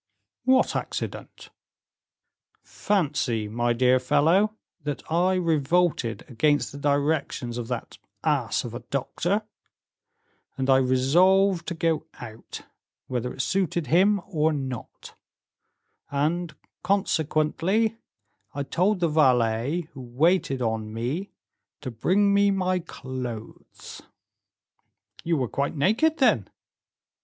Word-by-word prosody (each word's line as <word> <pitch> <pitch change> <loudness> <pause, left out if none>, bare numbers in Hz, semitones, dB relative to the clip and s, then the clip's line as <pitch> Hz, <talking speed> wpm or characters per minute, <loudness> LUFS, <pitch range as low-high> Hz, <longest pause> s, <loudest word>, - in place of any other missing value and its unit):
"What 260 0 +3
accident?" - - -5 1.1
"Fancy, 145 - -1
my 120 +3 0
dear 125 +2 +3
fellow, 175 +11 +2 0.3
that 145 -1 -4
I 180 +3 +2
revolted 165 -6 +1
against 145 +4 +1
the 140 - -9
directions 140 -4 -1
of 115 - -5
that 125 -1 -5 0.2
ass - - 0
of 120 - -7
a 120 - -5
doctor, 160 - -2 1.1
and 135 0 +1
I 130 - +6
resolved 170 +9 +3
to 170 - -3
go 165 -1 0
out, 115 -2 -9 0.4
whether 125 -1 -3
it 130 - -3
suited 180 -4 0
him 200 +3 +4
or 160 -5 +1
not: 135 -5 -6 1.0
and, 155 +3 -1 0.3
consequently, 190 +4 0 0.6
I 140 - -2
told 185 +7 0
the 170 - +3
valet 130 0 +2
who 135 - -9
waited 135 +2 +1
on 110 -1 -2
me 130 - -3 0.5
to 130 -4 -5
bring 200 - +2
me 200 0 +4
my 185 -2 +1
clothes." 130 -8 -8 1.2
"You 165 -1 +1
were 130 -3 0
quite 140 +6 -2
naked, 225 - +2
then?" 215 - +2
150 Hz, 110 wpm, -25 LUFS, 125-185 Hz, 1.2 s, I